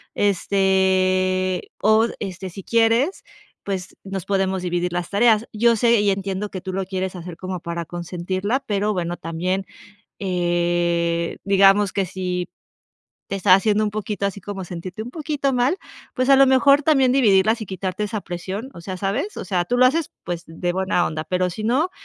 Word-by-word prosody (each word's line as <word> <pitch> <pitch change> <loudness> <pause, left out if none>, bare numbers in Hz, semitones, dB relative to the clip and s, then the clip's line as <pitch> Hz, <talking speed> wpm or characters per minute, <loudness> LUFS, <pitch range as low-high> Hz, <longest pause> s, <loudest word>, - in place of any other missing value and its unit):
este, 185 -1 +1
o 220 +2 +4
este 190 -1 -5
si 190 +2 -10
quieres, 230 - +2 0.4
pues, 190 -2 -4
nos 195 -2 -5
podemos 190 -1 0
dividir 175 0 -1
las 175 -1 -3
tareas. 220 +1 +3
Yo 230 +2 +3
sé 235 0 +4
y 205 - +2
entiendo 195 +1 -3
que 185 - -6
tú 185 +1 -5
lo 195 +1 -1
quieres 190 0 -3
hacer 175 -1 -8
como 185 -1 -5
para 170 0 -4
consentirla, 185 - -3
pero 205 0 0
bueno, 175 -2 -2
también, 180 +4 -2 0.6
eh, 175 -2 0
digamos, 195 0 +4
que 195 - 0
si 180 -1 -3 0.8
te 195 - -3
está 190 -1 +5
haciendo 210 +2 +2
un 210 - -2
poquito 210 -1 -3
así, 200 0 -3
como 195 -2 -6
sentirte 180 +3 -7
un 230 - -6
poquito 290 -2 -2
mal, 250 +8 +2 0.4
pues, 255 +1 0
a 275 - +8
lo 275 0 +7
mejor 275 +2 +5
también 270 -4 +4
dividirlas 220 -3 +4
y - - -4
quitarte 190 +1 -4
esa 210 +1 -3
presión, 190 +7 -5
o 170 - -10
sea, 185 +2 -6
¿sabes?, 210 - -2
o - - -5
sea, 180 -1 0
tú 245 +8 -1
lo 255 - +6
haces, 310 +5 +1
pues, 175 -1 -4
de 175 +2 -3
buena 185 -1 +1
onda, 155 0 -4
pero 180 +2 0
si 200 +5 -6
no, 270 +11 +1
195 Hz, 180 wpm, -22 LUFS, 180-215 Hz, 0.8 s, a